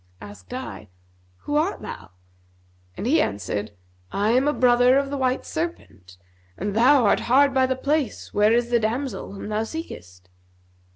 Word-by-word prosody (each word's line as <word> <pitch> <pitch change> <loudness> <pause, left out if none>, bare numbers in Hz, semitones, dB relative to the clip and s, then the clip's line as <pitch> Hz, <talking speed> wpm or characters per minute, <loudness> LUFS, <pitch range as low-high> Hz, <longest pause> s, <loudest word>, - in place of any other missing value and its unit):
Asked 100 -3 -12
I, - - -7 0.5
'Who 295 - -1
art 330 +7 -1
thou?' - - -8 0.9
and - - -4
he 310 +6 +3
answered, 105 +2 -3 0.4
'I 205 +2 +1
am 255 +4 +3
a - - +4
brother 250 0 +4
of 275 0 -1
the 285 - -2
white 260 -1 0
serpent, 205 - -6 0.4
and 205 +2 -3
thou 250 +2 +5
art 200 - +3
hard 275 +3 +3
by 260 -1 +3
the 260 - 0
place 280 0 -2
where 210 +1 +4
is 240 +1 +1
the 240 - +4
damsel 235 0 -3
whom 200 - -7
thou 215 0 -1
seekest.' 90 - -8
245 Hz, 165 wpm, -23 LUFS, 200-275 Hz, 0.9 s, thou